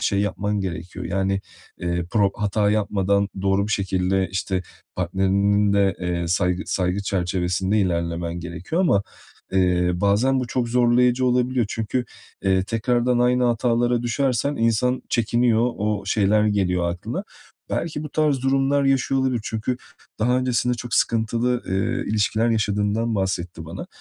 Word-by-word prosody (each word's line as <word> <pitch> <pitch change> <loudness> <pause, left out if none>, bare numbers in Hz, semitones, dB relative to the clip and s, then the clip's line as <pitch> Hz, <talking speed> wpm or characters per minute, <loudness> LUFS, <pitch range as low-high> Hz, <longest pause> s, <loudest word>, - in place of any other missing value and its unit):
şey 105 -2 0
yapman 100 0 -1
gerekiyor. 85 -2 -5
Yani, 95 +1 0 0.4
eee, 85 0 -1
pro 100 -3 +3
hata 105 0 +1
yapmadan 100 -1 +1
doğru 100 +1 +2
bir 110 - -2
şekilde, 95 0 0
işte, 95 -1 -2 0.3
partnerinin 100 +2 +2
de, 100 -2 +3
eee, 90 -1 -1
saygı, 90 +1 +1
saygı 90 +1 -1
çerçevesinde 95 +1 0
ilerlemen 85 -1 -2
gerekiyor 85 - -3
ama, 130 - +3 0.5
eee, 90 -2 +2
bazen 105 +8 +2
bu 125 - -3
çok 120 0 -1
zorlayıcı 125 +1 +3
olabiliyor. 125 -1 +1
Çünkü, 115 +4 -2 0.4
eee, 95 -1 +3
tekrardan 120 +3 +1
aynı 125 +1 +3
hatalara 120 0 +1
düşersen 130 +3 0
insan 115 +3 +1
çekiniyor. 120 +1 +2
O 105 -1 -1
şeyler 105 +1 +3
geliyor 90 -4 +1
aklına. 85 +1 -5 0.5
Belki 155 -3 -2
bu 150 - -5
tarz 150 -4 +1
durumlar 135 +1 +2
yaşıyor 135 0 +2
olabilir. 130 -3 0
Çünkü 110 +3 -2 0.4
daha 125 +3 +2
öncesinde 125 -1 +1
çok 120 0 -5
sıkıntılı, 115 +2 +1
eee, 95 +1 -1
ilişkiler 110 +2 +1
yaşadığından 110 +1 0
bahsetti 90 -4 -2
bana 85 +3 -7
105 Hz, 135 wpm, -23 LUFS, 95-120 Hz, 0.5 s, pro